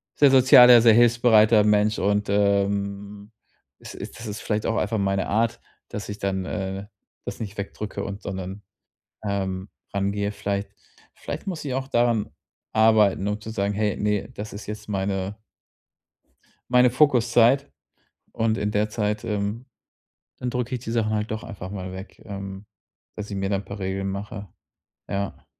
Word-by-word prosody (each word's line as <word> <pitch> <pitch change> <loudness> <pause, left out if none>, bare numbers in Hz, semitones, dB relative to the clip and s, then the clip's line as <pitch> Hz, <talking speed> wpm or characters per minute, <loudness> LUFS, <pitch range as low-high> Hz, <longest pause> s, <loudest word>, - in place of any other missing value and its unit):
sehr 140 -2 +5
sozialer, 125 -2 +8
sehr 115 -2 +7
hilfsbereiter 115 -2 +5
Mensch 105 +1 +3
und, 100 +1 +1
ähm, 100 +1 0 0.5
es - - -10
ist - - -8
das 115 - -7
ist 105 +1 -5
vielleicht 105 -1 -1
auch 115 - 0
einfach 110 +2 0
meine 95 -1 0
Art, 115 +2 +1 0.3
dass 105 - -6
ich 105 0 -6
dann, 95 -2 -2
äh, 95 -1 -4 0.4
das - - -6
nicht 100 -2 -6
wegdrücke 100 +1 -5
und 100 +1 -6
sondern, 95 +1 -5 0.6
ähm, 95 -1 -2 0.3
rangehe. 100 +1 0
Vielleicht 100 -1 -3 0.5
vielleicht - - -7
muss 180 -6 -4
ich 140 - -3
auch 130 0 -3
daran 120 -4 +2 0.4
arbeiten, 110 -3 +4
nur 105 +1 -2
zu 110 - -9
sagen: 100 -2 -1
„Hey, 105 -1 0
ne, 105 -1 -1
das 105 +1 -7
ist 100 - -8
jetzt 105 0 -7
meine 95 0 -2 1.3
meine 125 0 +6
Fokuszeit“ 125 0 +3 0.6
und 115 -1 +1
in 105 - -1
der 105 +1 +1
Zeit, 105 -1 -2
ähm, 105 +3 -2 0.7
dann 125 -1 -3
drücke 125 +1 -2
ich 120 - -8
die 115 -2 -5
Sachen 110 -2 +1
halt 105 0 -1
doch 110 - -4
einfach 95 -2 -8
mal 95 -2 -6
weg, 95 +1 -10
ähm, 100 0 -7 0.5
dass 105 0 -6
ich 100 - -4
mir 95 0 -1
da 100 - +1
'n 100 - -5
paar 100 +1 -8
Regeln 95 +1 -2
mache. 100 0 -6 0.6
Ja. 100 -1 -4
105 Hz, 165 wpm, -24 LUFS, 100-115 Hz, 1.3 s, sozialer